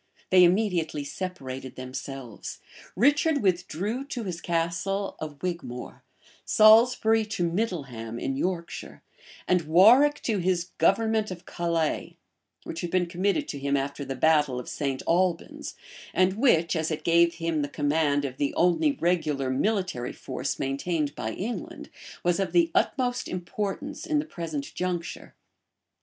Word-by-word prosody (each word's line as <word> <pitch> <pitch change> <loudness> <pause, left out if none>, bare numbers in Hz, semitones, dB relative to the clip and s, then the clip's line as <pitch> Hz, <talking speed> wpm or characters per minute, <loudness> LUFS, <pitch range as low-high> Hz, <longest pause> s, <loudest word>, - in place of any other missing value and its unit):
They 185 -1 +7
immediately 175 -5 +2
separated 135 -6 -6
themselves; 130 -2 -7 0.4
Richard 285 - +3
withdrew 195 - -1
to 265 -5 -5
his 175 -4 -5
castle 180 +4 -1
of 150 -1 -7
Wigmore; 170 -9 -5 0.4
Salisbury 220 0 +5
to 210 -4 -3
Middleham, 135 - -3
in 135 +2 -2
Yorkshire, 170 +3 -4 0.4
and 180 -1 +3
Warwick 225 - +6
to 215 -4 0
his 180 0 0
government 220 +1 +2
of 180 -2 -8
Calais, 170 -2 -2 0.5
which 165 - -6
had 175 - -3
been 185 0 +2
committed 195 - 0
to 140 - -4
him 140 0 +1
after 140 +1 -3
the 135 -1 -4
battle 150 -2 +3
of 125 - -8
St. 135 -3 -3
Albans, 175 0 0 0.4
and 185 0 +4
which, 190 - +3
as 160 -1 0
it 155 - -3
gave 170 0 +4
him 165 -2 -1
the 145 - -2
command 145 -1 +1
of 130 -1 -5
the 145 -1 -1
only 180 - +3
regular 155 - 0
military 185 - -1
force 130 - -4
maintained 145 +3 -1
by 110 - -4
England, 225 +5 -5 0.3
was 175 +1 +2
of 195 - -1
the 335 -1 +4
utmost 250 -2 0
importance 200 - -4
in 310 - +1
the 295 - 0
present 160 - -5
juncture. 180 -2 -4
175 Hz, 140 wpm, -27 LUFS, 145-200 Hz, 0.5 s, They